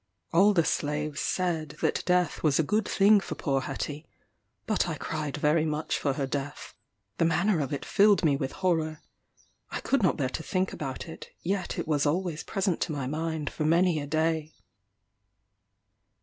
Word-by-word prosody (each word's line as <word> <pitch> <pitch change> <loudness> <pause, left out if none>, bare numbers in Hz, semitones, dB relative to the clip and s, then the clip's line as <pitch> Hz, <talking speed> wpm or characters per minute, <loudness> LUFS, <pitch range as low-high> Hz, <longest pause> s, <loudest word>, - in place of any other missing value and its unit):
All 200 +4 +5
the 170 -3 +4
slaves 150 0 -1
said 165 -5 -1
that - - +1
death 180 -1 +2
was 150 -3 +3
a 160 - +3
good 210 +6 0
thing 205 +1 +5
for - - -6
poor 135 -4 0
Hetty; 145 +3 -5 0.6
but - - +1
I - - -2
cried 150 -3 -3
very 150 +2 +3
much 155 0 -1
for 140 - 0
her 135 0 -1
death. 140 +2 -5 0.5
The 165 - +4
manner 170 +3 +2
of 140 -3 -2
it 145 - -3
filled 205 -3 +4
me 145 -3 +4
with 135 -1 -2
horror. 160 -3 +1 0.7
I - - -4
could 275 - +1
not 185 - +2
bear 135 -4 0
to 145 - -4
think 185 +3 -1
about 135 0 -5
it; 160 - -9
yet 190 +2 -2
it - - -3
was 150 -1 +2
always 170 0 -1
present 190 -4 -1
to 170 - 0
my 140 -3 -3
mind 155 +1 -2
for - - -3
many 170 +1 +3
a 145 - -5
day. 160 0 0
160 Hz, 180 wpm, -28 LUFS, 145-180 Hz, 0.7 s, All